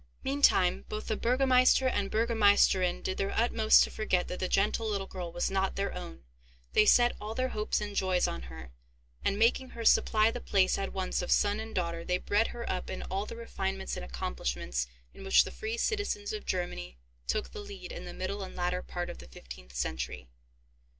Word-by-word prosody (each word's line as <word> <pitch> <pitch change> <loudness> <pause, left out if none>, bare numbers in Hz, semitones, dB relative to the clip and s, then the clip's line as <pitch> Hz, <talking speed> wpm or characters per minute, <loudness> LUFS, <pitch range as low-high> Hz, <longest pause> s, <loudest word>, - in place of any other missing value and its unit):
Meantime, 265 -10 +3
both 215 0 -4
the 220 - +1
burgomeister 255 +2 +4
and 205 -5 0
burgomeisterinn 205 -5 +3
did 185 - -3
their 195 0 -1
utmost 225 -1 +5
to - - -4
forget 185 -4 0
that 180 - -5
the 185 - -1
gentle 210 +4 +1
little 200 -2 -2
girl 180 -3 -6
was 175 +2 -1
not 190 0 0
their 200 0 -2
own; 65 0 -8 0.5
they 215 - +5
set 240 +2 +5
all 215 +2 -5
their 255 +1 0
hopes 215 -2 -1
and 205 -1 -5
joys 185 -2 +2
on - - -4
her, 65 +1 -10 0.5
and, 200 - +1
making 240 +4 +2
her 230 -2 -7
supply 220 0 +4
the 245 - -6
place 190 -2 +2
at 195 - -3
once 190 -1 -2
of 180 - -5
son 205 +1 +3
and 220 0 -7
daughter, 170 -2 -2
they 180 +1 0
bred 205 +4 +1
her 235 0 -7
up 185 - -3
in - - -5
all 195 +2 -2
the - - -7
refinements 195 -4 -4
and - - -6
accomplishments - - -3 0.3
in - - -12
which 195 - +5
the - - -7
free 220 +2 -4
citizens 405 - -1
of 215 - -6
Germany 175 - -3 0.3
took 65 - -1
the - - -8
lead 195 -3 -9
in - - -7
the - - -7
middle 195 +2 -4
and 190 - -7
latter 180 0 -1
part 175 -1 -5
of - - -8
the 65 - -11
fifteenth - - -12
century. 65 0 -3
195 Hz, 205 wpm, -30 LUFS, 180-220 Hz, 0.5 s, utmost